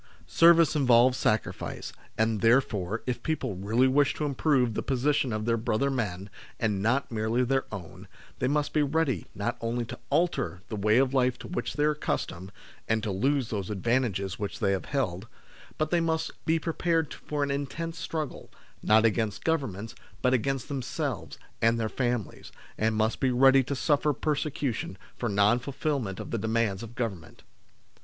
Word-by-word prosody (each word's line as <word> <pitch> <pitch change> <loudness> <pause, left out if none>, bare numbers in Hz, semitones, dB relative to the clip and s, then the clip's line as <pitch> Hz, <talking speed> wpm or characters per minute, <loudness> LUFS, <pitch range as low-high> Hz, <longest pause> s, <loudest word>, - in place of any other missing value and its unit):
Service 165 -2 +5
involves 125 -3 +5
sacrifice, 110 -3 -2 0.2
and 110 -2 +1
there 115 +5 +6
fore, 105 -4 -4
if 125 -2 -2
people 145 -8 -2
really 110 +7 +2
wish 140 +1 +3
to 150 - -2
improve 135 -4 +2
the - - -2
position 140 +1 +1
of 110 0 -2
their 115 0 +2
brother 115 +4 0
men, 100 -7 -2 0.3
and 105 -3 0
not 125 +6 +1
merely 110 +2 0
their 135 +2 +1
own, 95 -6 -8 0.3
they 125 - +1
must 145 +1 0
be 155 - +3
ready 145 - 0
not 115 +5 -2
only 115 +1 -1
to - - -8
alter 125 - 0
the 110 - -3
way 105 +2 +3
of 135 0 +3
life 125 -2 +2
to - - -9
which 180 - -3
they 150 - +1
are 150 - +4
accustomed, 95 - -3 0.4
and 110 -1 +1
to 105 - -1
lose 130 +5 +1
those 100 -3 -3
advantages 105 -3 -1
which 100 -1 -4
they 100 - +1
have 95 - -1
held, 110 -8 -2 0.5
but 155 0 -1
they 175 -1 +3
must 160 -1 0
be 160 +1 +3
prepared 165 -1 0
for 150 -1 -3
an 140 - -1
intense 160 +4 -4
struggle, 155 -4 -4 0.3
not 110 +1 +4
against 110 -1 0
Governments, 115 - -1 0.3
but 125 0 +3
against 135 +1 0
themselves 130 -3 -4 0.2
and 115 +1 +3
their 110 - 0
families, 120 -4 -3 0.2
and 110 0 0
must 110 +1 +1
be 135 - +2
ready 135 +2 +6
to 140 +3 -3
suffer 145 +2 +2
persecution 140 - -2 0.2
for 120 - -2
non 100 +4 +3
fulfilment 135 - -3
of - - -7
the 115 - -1
demands 110 -2 0
of 115 0 -9
Government. 100 -10 -5
125 Hz, 175 wpm, -28 LUFS, 110-140 Hz, 0.5 s, there